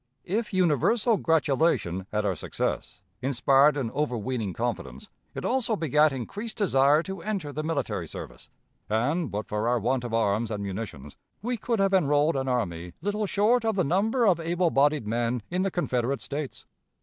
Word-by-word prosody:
If 210 +4 -1
universal 195 - +2
gratulation 140 - +1
at 105 0 0
our 100 - +1
success 90 +1 -4 0.2
inspired 135 +3 +4
an 120 -5 -2
overweening 125 -6 -2
confidence, 120 - -4 0.3
it - - -4
also 245 -3 +1
begat 155 -3 +3
increased 200 - -5
desire 150 -6 +4
to 190 -1 -6
enter 190 -9 -3
the 155 - -2
military 160 -2 -2
service; - - -9 0.4
and, 140 +10 0
but 105 +1 -3
for 105 +2 -1
our 120 +1 +3
want 125 +3 0
of 120 - -5
arms 110 0 +1
and 105 -2 -3
munitions, 95 -8 -6 0.3
we 245 +2 -1
could 230 +1 -1
have 195 -1 +2
enrolled 150 -3 +3
an 135 0 -1
army 90 -9 -2
little 205 +1 -1
short 220 +5 +2
of 220 -2 0
the 185 - +2
number 210 - +2
of 180 -5 +4
able 170 +1 0
bodied 145 -2 +3
men 115 +1 -1
in 180 +1 0
the 195 - +1
Confederate 135 -7 -1
States. 145 -1 -5
145 Hz, 170 wpm, -27 LUFS, 115-190 Hz, 0.4 s, inspired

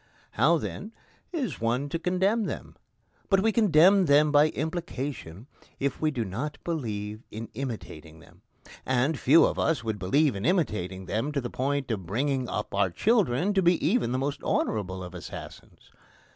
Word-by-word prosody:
How, 170 +2 +3
then, 210 +7 -6 0.4
is 260 - -3
one 120 +5 0
to 165 - -2
condemn 190 +6 +1
them? - - -6 0.5
But 195 -1 +4
we 225 +2 +3
condemn 195 -3 +5
them 145 +1 +5
by 145 +1 +6
implication 140 - -5 0.3
if 140 0 -2
we 155 - +2
do 125 -7 -2
not 135 +11 -4
believe 110 -10 -4
in 110 +1 -7
imitating 105 - -7
them; - - -19 0.4
and 130 +4 +1
few 155 +6 +6
of - - -1
us 155 -8 +1
would 110 -2 -3
believe 140 +7 +2
in 100 - -5
imitating 105 - -1
them 115 +10 -2
to 140 - 0
the 120 -2 -5
point 140 0 -1
of 95 -6 -4
bringing 130 - -1
up 105 - -4
our 100 -1 +2
children 195 - +1
to 195 - +3
be 175 0 +4
even 195 - +2
the 130 - 0
most 140 +2 -2
honourable 95 -3 -1
of 90 +1 -9
assassins. 90 - -10
140 Hz, 170 wpm, -27 LUFS, 110-165 Hz, 0.5 s, by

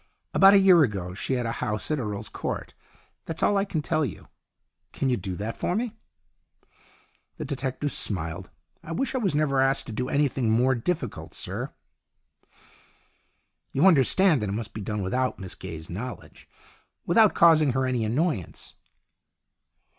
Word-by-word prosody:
About 195 +1 +7
a - - +7
year 185 -3 +6
ago 95 - -1
she 100 - -2
had 125 -2 -1
a 115 - -1
house 105 +7 -2
at 155 - 0
Earl's 105 -4 -4
Court. - - -5 0.5
That's 165 - -3
all 205 - +3
I 195 0 +2
can 165 -6 -3
tell 155 - 0
you. 125 - -6 0.6
Can 135 - -1
you - - +3
do 95 -3 -5
that 105 +5 -4
for 175 - -1
me? 230 +1 -2 0.7
" - - -34
The - - -5
detective 140 0 -3
smiled. 90 -1 -3 0.2
" - - -44
I 165 - -6
wish 270 +11 -1
I 260 - 0
was 195 -10 0
never 140 -3 +2
asked 135 +1 +2
to - - -7
do 125 +4 -2
anything 135 -5 +1
more 125 +4 +3
difficult, 130 - -3
sir." - - -5 1.0
" - - -35
You 140 +7 +3
understand 165 - +5
that 105 - -2
it - - -2
must 110 0 -4
be 110 - -6
done 105 0 -3
without 125 +7 -1
Miss 95 -3 -7
Gaye's 80 -1 -8
knowledge, 120 +8 -8 0.6
without 215 +4 +4
causing 155 -5 +5
her 130 0 +1
any 125 -3 0
annoyance." 120 - -2
130 Hz, 170 wpm, -26 LUFS, 105-160 Hz, 1.0 s, About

